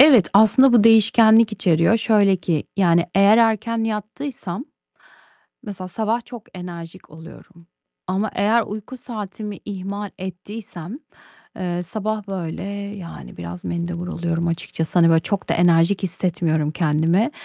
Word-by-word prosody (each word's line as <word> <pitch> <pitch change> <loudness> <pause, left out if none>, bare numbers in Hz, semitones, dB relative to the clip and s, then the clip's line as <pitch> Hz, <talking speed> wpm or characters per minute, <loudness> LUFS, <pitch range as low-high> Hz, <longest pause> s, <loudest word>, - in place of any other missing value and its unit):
Evet, 265 - +7
aslında 220 +6 +6
bu 230 -3 +5
değişkenlik 225 0 +5
içeriyor. 170 +1 +2
Şöyle 205 -4 +3
ki, 165 -3 -2
yani, 170 -3 +3
eğer 200 +3 +5
erken 225 0 +1
yattıysam, 225 0 -5 1.0
mesela 190 -3 -7
sabah 225 +4 -2
çok 240 -3 -10
enerjik 175 0 -9
oluyorum 165 +1 -15 0.4
ama 195 +3 -1
eğer 215 +4 +2
uyku 215 +4 -7
saatimi 210 -3 -7
ihmal 200 +1 -5
ettiysem, 185 - -8 0.6
eee, 180 -1 -3
sabah, 215 +3 -4
böyle, 175 -5 -5 0.3
yani, 170 - -10
biraz 85 +1 -8
mendebur 170 +1 -4
oluyorum 170 -1 -2
açıkçası. 165 0 -2
Hani, 165 -1 +6
böyle, 165 0 +4
çok 200 +2 -3
da - - +3
enerjik 170 +3 +3
hissetmiyorum 165 -4 -1
kendimi. 165 - +1
195 Hz, 125 wpm, -21 LUFS, 170-220 Hz, 1.0 s, Evet